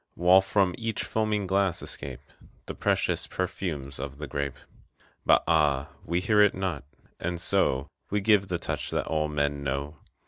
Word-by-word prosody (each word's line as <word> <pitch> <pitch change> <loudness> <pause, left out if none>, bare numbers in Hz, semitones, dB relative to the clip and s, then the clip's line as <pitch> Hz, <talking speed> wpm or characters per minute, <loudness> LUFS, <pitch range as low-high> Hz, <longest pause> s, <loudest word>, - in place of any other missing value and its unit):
While 90 +2 +6
from 95 -1 +1
each 115 -2 -2
foaming 110 -2 0
glass 95 -1 +1
escape - - -4 0.4
The - - -5
precious - - 0
perfumes 75 -8 -3
of 70 0 -6
the 75 - -5
grape. 70 0 -3 0.7
But - - +6
ah, 75 -4 +2
we 85 +2 -1
hear 105 +2 +4
it 105 -1 +5
not, 90 -7 -2 0.4
and 85 0 -3
so 65 -4 +2 0.2
We 105 - +1
give 100 -1 +3
the 90 -2 -1
touch - - -3
that - - -1
all 80 -1 0
men 70 -1 -1
know. 70 +2 -3
85 Hz, 165 wpm, -27 LUFS, 70-95 Hz, 0.7 s, While